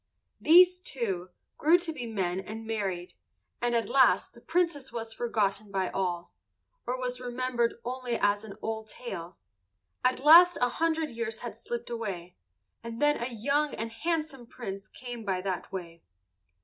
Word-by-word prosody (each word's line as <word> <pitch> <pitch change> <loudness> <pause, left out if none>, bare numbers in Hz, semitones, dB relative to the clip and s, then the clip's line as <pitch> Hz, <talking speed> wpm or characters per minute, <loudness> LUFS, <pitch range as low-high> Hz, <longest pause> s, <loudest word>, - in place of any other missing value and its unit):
These, 360 +3 +7
too, 205 - -3 0.3
grew 325 +4 +6
to 345 -2 -4
be 250 -6 -5
men 190 -5 -1
and 220 +3 -7
married, 195 -5 -3 0.5
and 240 0 +1
at 230 - +1
last 265 -2 +4
the 235 - -16
Princess 335 -5 0
was 225 -1 -4
forgotten 215 -3 0
by 190 -1 -1
all, 175 -2 -2 0.5
or 250 +1 0
was 250 0 -3
remembered 245 -1 0
only 250 -1 -2
as 205 +1 +2
an 210 -3 -9
old 220 0 -3
tale. 180 -7 -7 0.7
At 255 0 +2
last 340 +5 +8
a 245 - +3
hundred 320 +2 0
years 230 -1 -4
had 240 - -6
slipped 240 0 -5
away, 190 -7 -4 0.5
and 230 0 -6
then 295 -3 +3
a 235 - 0
young 280 +6 0
and 225 +1 -4
handsome 305 -1 -2
Prince 200 -5 -7
came 245 -2 -8
by 190 -3 -1
that 185 -1 -3
way. 170 -3 -7
235 Hz, 160 wpm, -29 LUFS, 200-260 Hz, 0.7 s, last